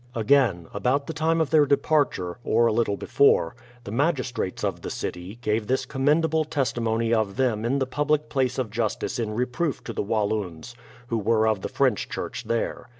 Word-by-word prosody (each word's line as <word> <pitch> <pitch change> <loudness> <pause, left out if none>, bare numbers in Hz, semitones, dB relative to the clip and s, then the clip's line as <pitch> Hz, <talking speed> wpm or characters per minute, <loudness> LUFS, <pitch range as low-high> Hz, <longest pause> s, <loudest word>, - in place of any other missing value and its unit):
Again, 115 -6 +3
about 125 +7 0
the 160 - -5
time 160 +2 +1
of 160 - 0
their 150 -2 +5
departure, 140 - +1
or 115 +1 +3
a 115 - +3
little 110 -3 +1
be - - -7
fore, 85 -11 +3 0.3
the 100 - -7
magistrates 130 - -1
of 95 -4 -2
the - - -5
city, 90 +4 -5
gave 105 0 0
this 130 +1 0
commendable 155 +4 +2
testimony 115 -6 0
of 110 -3 +1
them 120 -5 0
in 125 +4 +1
the 135 - +1
public 150 +3 0
place 130 -3 0
of 125 -5 -2
justice 115 +1 -2
in 110 -2 -2
reproof 125 +6 -1
to 115 - -6
the - - -2
Walloons, 105 -3 -2 0.4
who 115 - 0
were 110 +1 +2
of 110 -3 +1
the - - -4
French 130 -6 +1
church - - -5
there. 115 +2 -2
120 Hz, 190 wpm, -25 LUFS, 105-140 Hz, 0.4 s, their